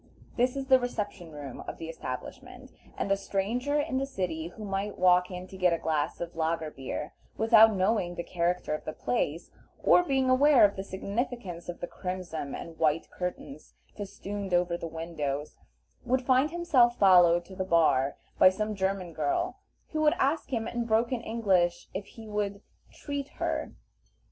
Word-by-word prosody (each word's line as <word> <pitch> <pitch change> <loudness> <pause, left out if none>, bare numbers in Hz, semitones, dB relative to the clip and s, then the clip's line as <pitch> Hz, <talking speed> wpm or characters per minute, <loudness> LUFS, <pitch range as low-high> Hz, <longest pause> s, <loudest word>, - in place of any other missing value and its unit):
This 250 +2 +2
is 275 -1 -3
the 260 -1 +6
reception 205 -8 -4
room 145 -3 -8
of - - -5
the 165 - -7
establishment, 130 -6 -7 0.3
and 195 - -2
a - - +5
stranger 225 +9 -1
in 260 -2 -1
the 275 - -2
city, 175 -10 -3
who 210 +5 -9
might 195 +1 -3
walk 180 0 +4
in 180 -1 -6
to 190 - -10
get 180 -2 +3
a - - +1
glass 155 -2 -1
of 170 0 -5
lager 160 -1 -1
beer, 135 +2 -5 0.2
without 225 -1 +6
knowing 185 -2 +1
the 170 - -4
character 175 -2 -1
of 155 - -4
the 155 - -5
place, 145 +6 -2 0.3
or - - +6
being 270 -6 +1
aware 260 0 +6
of 200 - +1
the 195 - -4
signification 200 -1 -4
of 175 - -15
the - - -1
crimson 180 -6 -5
and 165 -1 -9
white 155 0 +1
curtains 180 -5 -6 0.2
festooned 200 -1 -4
over 175 0 +1
the 170 - -5
windows, 155 -3 -4 0.5
would 255 +1 +1
find 260 +3 +3
himself 295 -8 +3
followed 175 -3 +6
to 190 - -12
the 190 - -2
bar 160 -6 +3 0.2
by - - +9
some 215 +3 -2
German 190 -3 -2
girl, 150 -2 -1 0.3
who 310 - -1
would 300 -1 +4
ask 280 +1 0
him 225 -3 -1
in 235 0 -2
broken 230 +2 +1
English 195 -7 +1
if 195 +1 -5
he 225 -1 -12
would 205 -1 -3 0.3
"treat 285 -2 -5
her." - - -2
190 Hz, 175 wpm, -29 LUFS, 170-235 Hz, 0.5 s, by